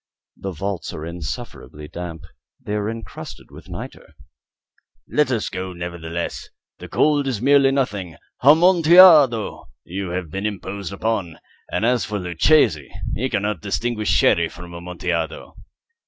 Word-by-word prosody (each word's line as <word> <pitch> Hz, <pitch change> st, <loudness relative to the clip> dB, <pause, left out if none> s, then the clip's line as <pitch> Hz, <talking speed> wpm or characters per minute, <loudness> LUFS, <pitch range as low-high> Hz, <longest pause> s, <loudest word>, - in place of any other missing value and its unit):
The 95 Hz, -, -6 dB
vaults 95 Hz, +2 st, -4 dB
are 80 Hz, -, -6 dB
insufferably 75 Hz, -2 st, -7 dB
damp. 85 Hz, 0 st, -7 dB, 0.4 s
They 105 Hz, -, -6 dB
are 105 Hz, 0 st, -1 dB
encrusted 115 Hz, -3 st, -9 dB
with -, -, -13 dB
nitre." -, -, -9 dB, 0.9 s
"Let 150 Hz, -2 st, +1 dB
us 120 Hz, -4 st, -1 dB
go, 95 Hz, 0 st, -5 dB
nevertheless. 85 Hz, -1 st, -5 dB, 0.3 s
The -, -, -9 dB
cold 145 Hz, -2 st, +2 dB
is 125 Hz, -6 st, -1 dB
merely 140 Hz, +2 st, +5 dB
nothing. 100 Hz, -, -2 dB, 0.2 s
Amontillado! 160 Hz, -, +6 dB
You 95 Hz, +1 st, -5 dB
have 90 Hz, -3 st, -4 dB
been 95 Hz, +4 st, -2 dB
imposed 100 Hz, -1 st, -5 dB
upon. 100 Hz, -5 st, -2 dB, 0.3 s
And 110 Hz, -, 0 dB
as 125 Hz, 0 st, +2 dB
for 105 Hz, -1 st, -3 dB
Luchesi, 90 Hz, -, +2 dB, 0.2 s
he 130 Hz, +6 st, -1 dB
cannot 105 Hz, -4 st, -1 dB
distinguish 105 Hz, +2 st, -2 dB
Sherry 85 Hz, -1 st, +3 dB
from 85 Hz, 0 st, -11 dB
Amontillado." 85 Hz, -2 st, -4 dB
100 Hz, 130 wpm, -21 LUFS, 85-120 Hz, 0.9 s, Amontillado